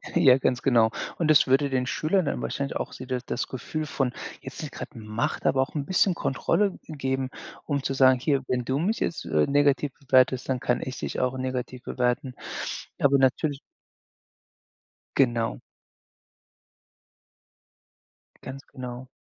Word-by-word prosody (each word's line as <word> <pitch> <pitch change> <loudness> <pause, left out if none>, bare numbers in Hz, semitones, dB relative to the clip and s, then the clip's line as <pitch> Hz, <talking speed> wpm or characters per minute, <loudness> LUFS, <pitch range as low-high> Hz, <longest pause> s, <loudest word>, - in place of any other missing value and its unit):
Ja, 135 -7 +7
ganz 125 -1 0
genau. 115 -4 +4 0.3
Und 165 - +1
das 155 - +7
würde 135 +2 +3
den 130 -1 0
Schülern 170 +7 +1
dann - - -2
wahrscheinlich 140 0 -3
auch - - -3
so 130 - -8
das 125 -1 -3
das - - -3
Gefühl 155 +4 -4
von 135 -4 -1 0.3
jetzt 130 +5 -8
nicht 150 - -6
gerade 150 - -8
Macht, 110 +1 -3
aber 130 - +3
auch 135 - -3
'n 145 -2 -1
bisschen 185 0 +3
Kontrolle, 195 +9 0
äh, 160 - -7
geben, 130 -2 -1 0.4
um 140 -3 -1
zu 135 - -1
sagen: 130 -1 +5
„Hier, 140 +1 +1
wenn 125 -1 -1
du 135 +2 0
mich 210 +7 0
jetzt, 165 - -2
äh, 75 -1 +2
negativ 145 0 +3
bewertest, 130 -1 +3
dann 130 -1 +1
kann 120 0 0
ich 130 -1 -5
dich - - -4
auch 125 +1 0
negativ 130 -1 -4
bewerten.“ 125 +1 -1 0.7
Aber 140 0 +4
natürlich 135 +2 +2 1.6
Genau. 120 -4 +2 2.8
Ganz 135 +1 -8
genau. 125 -1 -7
130 Hz, 155 wpm, -26 LUFS, 125-145 Hz, 2.8 s, Ja